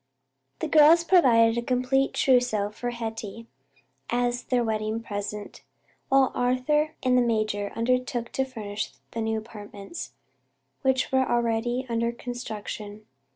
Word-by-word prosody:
The - - -1
girls 315 +2 +6
provided 235 -10 +5
a - - -2
complete 255 +2 +1
trousseau 245 -6 +2
for 245 +3 -4
Hetty, 225 -1 -6 0.6
as 245 0 0
their 245 -2 +1
wedding 220 0 -2
present, 205 -1 -6 0.5
while 270 -1 +4
Arthur 275 +5 +1
and 255 -1 +3
the 250 - +5
major 215 -3 0
undertook 245 0 -1
to 265 - 0
furnish 215 - -5 0.2
the 230 - -3
new 220 0 0
apartments, 210 +5 -8 0.7
which 265 -1 +1
were 265 0 +2
already 240 +1 0
under 235 0 0
construction. 215 -3 -7
235 Hz, 125 wpm, -26 LUFS, 220-255 Hz, 0.7 s, girls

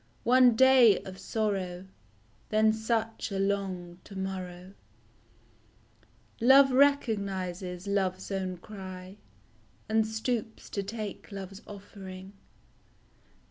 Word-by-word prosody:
One 250 0 +5
day 255 -4 +7
of 190 0 -9
sorrow 195 -4 -2 0.6
Then 215 0 +3
such 225 0 -2
a 195 - -2
long 190 -3 -2
to 195 - -10
morrow! 185 -1 -6 1.7
Love 270 +3 +7
recognizes 200 -9 +1
love's 190 -1 -1
own 185 -2 -2
cry, 185 0 -9 0.7
And 220 0 +2
stoops 220 0 -3
to 200 - -2
take 215 +1 -6
love's 195 0 -8
offering. 195 -2 -10
200 Hz, 95 wpm, -29 LUFS, 185-220 Hz, 1.7 s, day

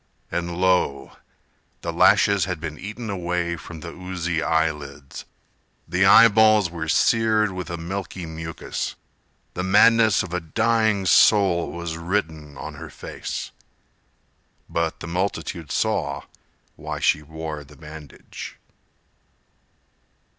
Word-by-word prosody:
And 85 0 -3
lo, 90 -6 +1 0.6
the - - -4
lashes 100 -3 +4
had 90 -3 -4
been 75 -1 -6
eaten 110 +4 -7
away 90 -2 -2
From 80 -1 -10
the 85 - -7
oozy 90 -2 -3
eye 80 0 +2
lids; 70 -2 -10 0.6
The 90 +2 +2
eye 115 +4 +9
balls 110 -4 +4
were 85 -2 -5
seared 110 -2 +3
with 90 -1 -6
a 85 - -4
milky 90 +1 -5
mucus; 80 0 -5 0.6
The - - -3
madness 105 +2 +5
of 90 -2 -8
a 90 - 0
dying 110 +3 +1
soul 95 -4 +4
Was 85 -1 -5
written 80 -5 -3
on - - -7
her - - -7
face— - - -6 1.2
But 85 -1 -2
the 85 - -6
multitude 90 -3 -3
saw - - -1 0.5
why - - -6
she 75 - +2
wore 80 0 -6
the 75 +1 -17
bandage." 75 0 -10
85 Hz, 125 wpm, -23 LUFS, 80-100 Hz, 1.2 s, eye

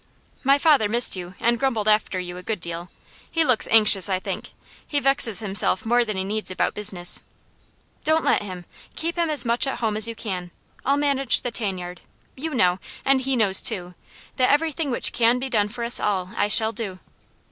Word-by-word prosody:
"My 275 +1 +4
father 285 -8 +3
missed 240 0 +3
you, 180 0 -8
and 235 0 +1
grumbled 230 -6 -1
after 210 -3 +1
you 175 -1 -7
a - - -8
good 210 +2 -4
deal. 170 +1 -7 0.4
He 330 - +1
looks 250 -5 +3
anxious, 210 -4 +5
I 190 - +1
think. - - -7 0.3
He 290 - 0
vexes 275 -6 +3
himself 195 -2 0
more 240 +2 +2
than 215 -4 -5
he 190 - -1
needs 210 +2 -4
about 185 - -1
business." 195 -4 0 0.8
"Don't 315 +1 +1
let - - +2
him. 185 -3 -8 0.3
Keep 335 +1 -3
him 340 -2 -1
as 290 -5 +3
much 235 +3 +1
at 270 - -3
home 220 -3 -2
as 215 +1 +2
you 230 - -6
can. 185 -6 -5 0.3
I'll 275 +2 +1
manage 275 -3 +1
the 245 - -4
tan 205 -5 -3
yard: 180 -1 -9 0.3
you 305 +2 -5
know 180 -5 +2 0.3
and 270 -1 +3
he 265 0 -1
knows 205 -5 +5
too 180 -5 +2 0.4
that 255 - +2
everything 305 0 0
which 245 - +2
can 235 +1 +2
be 265 +1 -5
done 210 -3 +1
for 235 +3 -7
us 235 +1 +1
all 185 -3 -2
I 205 - +1
shall 220 +1 +2
do." 215 -5 -5
225 Hz, 205 wpm, -22 LUFS, 190-265 Hz, 0.8 s, anxious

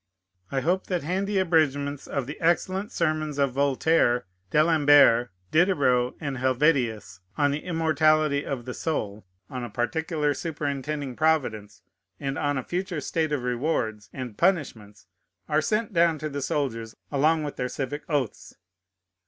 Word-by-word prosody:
I 135 - 0
hope 180 +5 0
that 180 -4 -1
handy 195 +5 -1
abridgments 145 -6 +1
of 140 -3 -2
the 145 +4 -8
excellent 185 +5 +1
sermons 155 - -1
of 140 -2 +2
Voltaire, 135 -2 +2 0.2
D'Alembert, 145 - +5 0.2
Diderot, 140 -8 +3
and 140 -3 -4
Helvétius, 125 - +1 0.2
on 145 -1 +3
the 145 +2 -3
Immortality 155 -3 +2
of 125 -4 -4
the 125 - -5
Soul, 105 - -3 0.2
on 125 -1 -6
a 120 - -5
Particular 150 +7 -1
Superintending 145 -3 -4
Providence, 110 -11 0 0.4
and 135 -1 -3
on 145 -2 0
a 130 - -2
Future 180 +1 -3
State 155 +2 -1
of 145 -4 -1
Rewards 120 -5 -2
and 125 -5 -7
Punishments, 115 - -1 0.4
are 150 0 +2
sent 215 +5 -1
down 170 -2 +3
to 155 +1 -4
the 140 0 -4
soldiers 115 -6 -2 0.2
along 155 +3 +2
with 145 - -5
their 125 - -2
civic 145 +3 -4
oaths. 140 -7 -2
145 Hz, 145 wpm, -26 LUFS, 125-160 Hz, 0.4 s, D'Alembert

